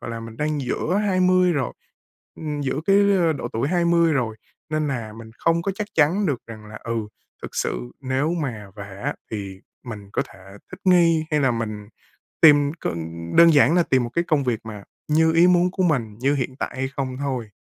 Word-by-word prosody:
gọi - - -6
là, 115 0 -5
mình 115 0 -9
đang 150 -1 -1
giữa 155 +8 -1
20 185 -1 +3
rồi 140 -6 -1 0.6
ừm, 150 -2 -4
giữa 135 +2 -2
cái, 195 0 +5 0.2
a, 165 -2 +3
độ 145 - -5
tuổi 115 +5 -1
20 170 -1 +3
rồi, 115 -6 -1 0.3
nên 155 -1 0
là 115 -6 -4
mình 110 0 -11
không 165 0 +1
có 195 - -1
chắc 210 -1 -4
chắn 165 +7 +3
được 140 -7 -1
rằng 110 -2 -10
là, 105 0 -10
ừ, 115 - -3 0.5
thực - - -8
sự - - -2
nếu 135 +4 -1
mà 125 -11 -4
về 100 -1 -9
á - - -1 0.2
thì 100 -3 -6 0.2
mình 105 -4 -8
có - - 0
thể - - -16 0.3
thích 185 - -9
nghi, 170 -3 +4
hay 150 -1 +2
là 135 -2 +3
mình 110 -3 -4 0.5
tìm 145 -2 +6
cơn 85 - -3 0.4
đơn 170 -1 +7
giản 145 +2 +5
là 175 - +4
tìm 130 -4 +2
một 120 - -4
cái 170 - +1
công 155 -5 +1
việc 120 -4 -1
mà 105 -3 -8 0.2
như 160 +2 +3
ý 170 +2 +6
muốn 180 0 +3
của 190 -1 -1
mình, 125 -11 0
như 140 +3 +2
hiện 130 -1 -3
tại - - -3
hay 130 0 -1
không 130 -2 -3
thôi. 130 -6 -3
140 Hz, 215 wpm, -23 LUFS, 115-165 Hz, 0.6 s, đơn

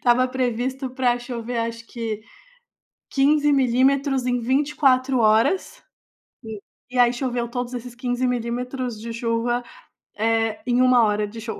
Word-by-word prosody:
estava 250 +1 +4
previsto 255 +1 -2
pra 250 -1 +1
chover, 240 -1 -5
acho 230 0 -4
que 225 -3 -5 0.9
15 290 +2 +3
milímetros 270 +1 +2
em 245 -1 0
24 265 0 +2
horas. 230 - +2 0.6
E 220 -2 -7 0.3
e 250 - -6
aí 245 0 +5
choveu 245 -1 -2
todos 245 +1 -4
esses 245 0 -7
15 245 +1 -2
milímetros 245 0 -3
de 230 +1 -6
chuva, 235 +1 -1 0.5
eh, 225 0 +1
em 245 0 +3
1 255 -2 +5
hora 210 -1 +1
de 225 +2 -9
show. 225 0 -6
245 Hz, 140 wpm, -23 LUFS, 230-255 Hz, 0.9 s, aí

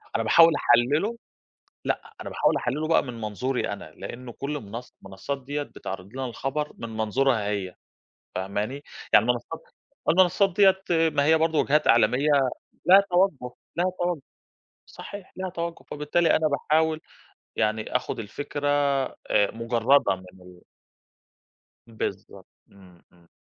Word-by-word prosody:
أنا 115 - +1
باحاول 165 +10 +7
أحَلِّله 145 - +2 0.7
لأ، - - -3
أنا - - -6
باحاول - - +2
أحَلِّله 150 +5 -2
بقى 165 - +4
من 120 -3 -8
منظوري 120 +5 -2
أنا 100 -6 -8
لأنه 120 +5 -8
كل 145 +5 -4
منص 115 +4 -9
منصات 100 +9 -6
ديّة 145 +2 -3
بتعرض 95 -7 -8
لنا 135 +1 -4
الخبر 135 +5 -3
من 115 - -6
منظورها 110 0 +1
هي، 100 -3 -3 0.6
فاهماني؟ 105 +9 -3 0.3
يعني 105 - +7
المنصات 125 +7 -2 0.5
المنصات 185 +3 +4
ديّة 190 -2 +5 0.3
ما 145 -2 +1
هي 160 +2 +5
برضه 160 -1 +1
وجهات 150 +2 +2
إعلامية 120 +5 +4 0.6
لها 190 +3 +8
تَوَجُّه، 175 -9 +1 0.2
لها 175 - +1
تَوَجُّه 175 -4 -1 0.6
صحيح، 200 -2 -10
لها 185 0 -4
تَوَجُّه 170 -1 -5
فبالتالي 150 +3 +2
أنا 155 - +2
باحاول 155 +2 +1 0.6
يعني 110 +2 0
آخد 125 - -4
الفكرة 145 +6 -4 0.6
آآ 100 - +3
مُجَرَّدة 115 0 +2
من 95 0 -15
ال 90 -1 -15 1.3
بالضبط، 100 -4 -6 0.3
إمم. 90 -3 -18
إمم. 85 -1 -24
130 Hz, 135 wpm, -25 LUFS, 110-160 Hz, 1.3 s, لها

